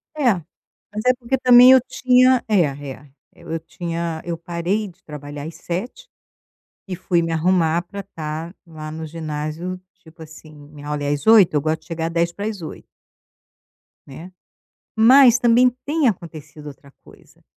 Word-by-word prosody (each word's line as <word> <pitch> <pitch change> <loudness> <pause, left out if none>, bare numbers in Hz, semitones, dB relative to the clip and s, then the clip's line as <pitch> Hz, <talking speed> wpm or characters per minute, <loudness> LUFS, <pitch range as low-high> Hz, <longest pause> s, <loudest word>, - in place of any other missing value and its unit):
É, 265 -7 +3 0.6
mas 215 +1 -4
é 255 - +5
porque 255 +2 -1
também 250 0 +7
eu 260 -1 +7
tinha 255 -1 +3
É, 210 -4 +3
é, 140 -2 -5 0.2
e - - -19
eu 165 0 -5
tinha 165 0 -5
eu 170 -1 -4
parei 175 +5 -3
de 180 -1 -17
trabalhar 145 -1 -9
às 165 - -10
7h, 240 - -6 0.8
e 185 - -4
fui 175 -1 0
me 165 0 -3
arrumar 170 0 +1
pra 200 +3 -8
tá 165 -2 -7
lá 155 -2 -9
no 160 0 -6
ginásio, 160 +3 -5 0.2
tipo 160 0 -15
assim, 155 0 -14
minha 145 0 -14
aula 150 -1 -3
é - - -2
às 145 +5 -4
8h, 215 -7 +6
eu 150 - +2
gosto 155 +2 -2
de - - -23
chegar 165 -1 -3
7:50. 170 +2 -4 1.2
Né. 160 +7 -11 0.6
Mas, 245 +2 +6
também 245 +1 +4 0.2
tem 300 -1 +1
acontecido 155 -7 -6
outra 140 -1 -13
coisa. - - -21
170 Hz, 155 wpm, -20 LUFS, 155-215 Hz, 1.2 s, também